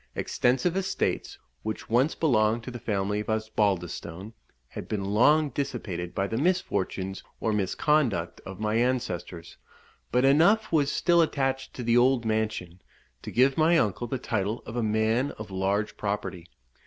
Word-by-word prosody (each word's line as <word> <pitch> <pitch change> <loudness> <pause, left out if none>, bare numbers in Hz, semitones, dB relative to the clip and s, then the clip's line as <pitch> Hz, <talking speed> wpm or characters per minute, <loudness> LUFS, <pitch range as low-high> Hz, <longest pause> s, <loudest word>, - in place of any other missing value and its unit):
Extensive 130 +8 +1
estates, 190 -1 -1 0.2
which 110 0 -5
once 125 +7 +2
belonged 115 -6 +2
to 125 - -6
the 120 - -7
family 105 -1 -1
of 105 - -5
Osbaldistone, 100 -3 -2 0.4
had - - -8
been 100 -3 -2
long 145 +10 +4
dissipated 110 -11 -4
by 95 - 0
the 110 +4 -2
misfortunes 95 - -1 0.2
or 110 - 0
misconduct 105 - 0
of 95 0 -9
my 110 0 -1
ancestors; 90 -9 -2 0.5
but 125 +2 +3
enough 175 +11 +4
was 145 -4 +2
still 170 -1 +3
attached 135 -4 -1
to 125 - -5
the 120 +1 +3
old 125 -1 +3
mansion, 110 -5 -2 0.4
to - - -7
give 130 +4 +3
my 165 +2 +5
uncle 115 - 0
the 130 - -2
title 110 -1 -2
of 115 - -7
a 120 - 0
man 110 +5 +1
of 105 -2 -8
large 100 +2 -1
property. 100 -4 -4
110 Hz, 155 wpm, -27 LUFS, 100-135 Hz, 0.5 s, my